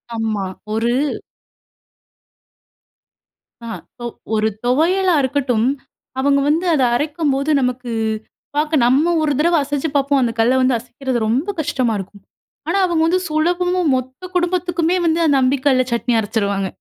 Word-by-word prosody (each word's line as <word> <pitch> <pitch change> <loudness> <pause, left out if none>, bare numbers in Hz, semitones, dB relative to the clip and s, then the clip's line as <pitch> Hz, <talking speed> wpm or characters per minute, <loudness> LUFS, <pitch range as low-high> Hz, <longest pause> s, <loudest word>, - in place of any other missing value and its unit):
ஆமா, 220 -3 -2 0.3
ஒரு 230 +2 +1 2.7
ஆ - - -7 0.2
இப்ப 240 - -11 0.3
ஒரு 215 0 +2 0.2
துவையலா 345 +7 +2
இருக்கட்டும், 255 -4 0 0.5
அவுங்க 280 +1 +3
வந்து 330 +5 +1
அத 280 -4 +2
அரைக்கும்போது 290 0 -1
நமக்கு 250 -1 -2 0.6
பார்க்க 300 -2 +2
நம்ம 300 +7 +3
ஒரு 305 -1 +1
தடவ 340 +3 +3
அசச்சு 290 +2 -2
பார்ப்போம். 280 0 +2
அந்த 235 -2 +1
கல்ல 240 +3 +3
வந்து 255 -1 +3
அசைக்கிறது 250 +1 -4
ரொம்ப 255 - 0
கஷ்டமா 265 -6 0
இருக்கும். 195 +1 -10 0.5
ஆனா, 345 +4 +1
அவுங்க 335 -3 +1
வந்து 365 +2 +2
சுலபமும், 350 +2 +1
மொத்த 260 +7 -5
குடும்பத்துக்குமே 350 -1 0
வந்து 330 0 +2
அந்த 285 -3 +3
அம்மிக்கல்ல 260 0 +2
சட்னி 235 +1 0
அரச்சிருவாங்க! 200 -3 -1
275 Hz, 130 wpm, -19 LUFS, 245-320 Hz, 2.7 s, அவுங்க